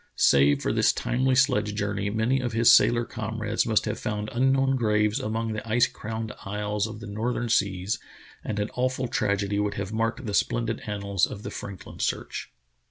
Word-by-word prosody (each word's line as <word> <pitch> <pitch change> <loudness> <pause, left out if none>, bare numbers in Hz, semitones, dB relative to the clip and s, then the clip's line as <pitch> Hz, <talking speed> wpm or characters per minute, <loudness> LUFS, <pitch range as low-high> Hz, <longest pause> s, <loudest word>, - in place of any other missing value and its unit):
Save 70 +1 +4
for - - 0
this - - +4
timely 130 +1 0
sledge 125 -6 +2
journey, 100 0 -1
many 110 +5 +1
of 120 -2 -3
his 115 +1 +6
sailor 120 0 +5
com 110 0 -5
rades 105 +1 0
must 110 -2 +2
have 105 0 -3
found 105 0 -3
unknown 135 +2 +2
graves 105 -1 +1
among 115 -2 -2
the 110 +1 -6
ice 120 +2 +4
crowned 110 0 -5
isles 105 +1 -2
of 110 0 -9
the - - -7
northern 115 +3 -2
seas, 100 -2 +1 0.4
and 105 - -3
an 105 +1 -2
awful 130 0 -1
tragedy 100 -2 0
would 105 0 -1
have 100 +1 -4
marked 115 +3 -1
the 105 - -3
splendid 115 +2 0
annals 100 -3 0
of 105 - -8
the - - -5
Franklin 100 -3 -8
search. - - -3
110 Hz, 185 wpm, -26 LUFS, 105-120 Hz, 0.4 s, his